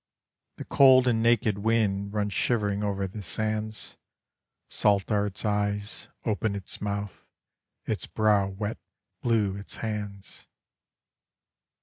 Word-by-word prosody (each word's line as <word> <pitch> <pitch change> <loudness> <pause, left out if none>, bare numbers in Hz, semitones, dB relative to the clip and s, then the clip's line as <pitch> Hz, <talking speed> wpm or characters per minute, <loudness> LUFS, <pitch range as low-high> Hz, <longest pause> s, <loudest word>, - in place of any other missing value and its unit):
The - - -7
cold 130 -2 +6
and 115 -2 +2
naked 115 -3 +3
wind 100 -2 +1
runs 105 -1 -1
shivering 105 -4 +1
over 100 -1 -1
the 95 +3 -6
sands, 110 +4 -3 0.7
Salt 100 0 +2
are 105 -1 +2
its 100 +2 -5
eyes, 105 0 -1 0.2
open 110 -1 0
its 100 -3 -5
mouth, 100 -1 -4 0.6
its - - -3
brow 105 -2 +3
wet, 100 +3 -4 0.4
blue 110 -5 +1
its 100 - -7
hands. 105 -3 -6
105 Hz, 115 wpm, -27 LUFS, 100-110 Hz, 0.7 s, cold